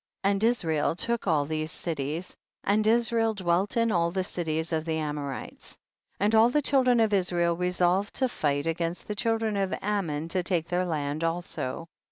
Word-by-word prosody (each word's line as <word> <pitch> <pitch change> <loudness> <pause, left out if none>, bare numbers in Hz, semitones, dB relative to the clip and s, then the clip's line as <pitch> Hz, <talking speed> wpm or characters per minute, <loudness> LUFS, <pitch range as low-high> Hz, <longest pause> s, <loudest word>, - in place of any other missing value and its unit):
And 200 +1 +2
Israel 165 -11 +1
took 235 +3 -1
all 150 -4 +2
these 155 +1 -3
cities, 160 0 -4 0.3
and 215 +2 +2
Israel 230 -1 +2
dwelt 185 +2 0
in 230 -1 +3
all 170 -3 +2
the 185 +2 -1
cities 160 -3 -2
of 160 -1 0
the 160 -1 -2
Amorites. 150 -3 -5 0.4
19. 200 - +2
And 210 - +2
all 230 - +5
the 295 +4 +2
children 255 -3 +3
of 220 -2 +3
Israel 175 -3 +2
resolved 180 +2 +1
to 260 - +2
fight 145 - -1
against 165 +1 -2
the 210 - -2
children 225 0 0
of 195 -1 0
Ammon, 170 -7 -2
to 185 +2 +1
take 175 -2 -1
their 180 +1 +1
land 150 -1 -2
also. 165 -3 -3
175 Hz, 180 wpm, -27 LUFS, 160-210 Hz, 0.4 s, all